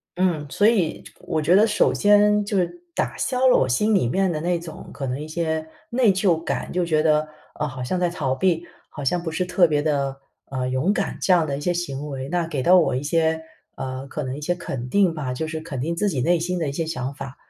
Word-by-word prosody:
嗯， 175 -5 0
所 205 +8 +3
以， 190 -9 +1
就 - - -14
我 155 - -2
觉 165 +5 +4
得 210 - +6
首 215 -2 +2
先 210 0 +4
就 205 -1 -1
是 180 - +2 0.3
打 - - -1
消 260 0 +1
了 250 - +6
我 130 - +2
心 210 - +2
里 125 - +2
面 190 +6 +1
的 155 - -2
那 175 0 0
种， 165 -2 -10
可 135 -2 -4
能 130 +3 -3
一 150 - -6
些 160 -1 -2 0.2
内 235 -4 +4
疚 185 -3 +2
感， - - -3
就 180 -1 0
觉 155 -2 +2
得， 155 -1 +2 0.3
啊， 150 - -2
好 130 -1 -7
像 180 +8 -1
在 175 -1 +2
逃 135 -6 -2
避， 170 +2 +1 0.3
好 145 - -8
像 170 +6 +1
不 160 - -3
是 170 +3 -1
特 180 -1 +4
别 150 -1 +1
的， 140 -3 0 0.4
呃， 130 -1 -2
勇 135 +11 +1
敢， 195 - -2
这 185 - +3
样 165 -3 +3
的 140 -1 -2
一 - - -6
些 175 +3 0
行 150 -4 -4
为， 135 0 -5
那 175 -1 0
给 145 -5 -2
到 180 +6 +6
我 160 -7 +3
一 130 - -1
些 160 +2 +1 0.3
呃， 130 0 -5
可 150 - -5
能 130 +2 -4
一 - - -8
些 175 +4 0
肯 130 -8 -5
定 190 +1 +3
吧， 135 -5 -3
就 160 +5 -3
是 160 0 -4
肯 140 -6 -5
定 165 +4 -2
自 205 +3 0
己 135 -8 -1
内 175 +5 +3
心 180 +2 -2
的 155 -4 -1
一 - - -3
些 160 +3 -2
想 135 -4 -3
法。 135 -1 -8
160 Hz, 280 characters per minute, -23 LUFS, 140-180 Hz, 0.4 s, 得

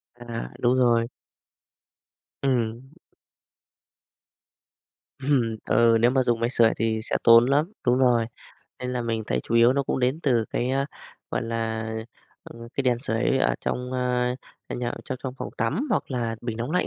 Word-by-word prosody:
À, 120 -1 -6
đúng 125 +1 +3
rồi. 120 -2 +3 1.3
Ừm. 125 0 -1 2.3
Ừm, 130 -5 +1
ừ, 115 -1 +4
nếu 120 +1 +5
mà 130 -1 +2
dùng 120 -2 +1
máy 115 +1 +1
sưởi 115 -3 +4
thì 110 -1 0
sẽ - - -1
tốn 115 0 +8
lắm, 145 +8 +1
đúng 125 +1 +4
rồi, 120 -3 +3 0.5
nên 125 0 -4
là 125 -1 -1
mình 115 -1 -2
thấy 65 - 0
chủ 115 - -3
yếu 120 +2 +6
nó 140 0 +1
cũng 130 - -2
đến 130 +6 0
từ 120 -5 +2
cái, 125 +2 -1
a, 135 +1 0 0.4
gọi - - -1
là, 115 -1 -2 0.6
ờ, 115 - -12
ờ, 115 - -9
cái 140 - 0
đèn 125 -2 +2
sưởi 125 +1 0
ở - - +2
trong, 125 +1 -3
a, 125 -1 0 0.3
à, - - -4
nhà 120 -1 -2
trong 130 - -4
trong 130 -1 -4
phòng - - -5
tắm 155 - -1
hoặc 200 - 0
là 115 -3 -2
bình 115 -2 -4
nóng 120 +5 -3
lạnh 180 +1 +1
120 Hz, 180 wpm, -25 LUFS, 115-130 Hz, 2.3 s, tốn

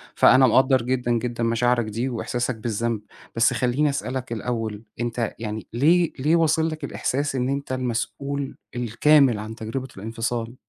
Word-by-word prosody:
فأنا 130 0 +6
مقدر 130 +2 +4
جدًا 125 0 -1
جدًا 120 0 -1
مشاعرك 120 0 +2
دي 115 +5 -2
وإحساسك 120 +1 -2
بالذنب. 115 0 -2 0.3
بس 120 +2 +3
خليني 130 +4 +1
أسألك 130 -3 -3
الأول 115 -1 -3 0.2
أنت 120 -1 -2
يعني 110 -1 -5
ليه 165 +7 +3
ليه 155 +5 +3
واصِل 160 0 +2
لك 155 -1 -7
الإحساس 140 0 -2
إن 125 +1 0
أنت 140 -1 -3
المسؤول 130 +3 -3 0.2
الكامل 125 +1 +4
عن 110 +1 -6
تجربة 120 +4 -5
الانفصال؟ 115 +3 -3
125 Hz, 145 wpm, -24 LUFS, 115-135 Hz, 0.3 s, فأنا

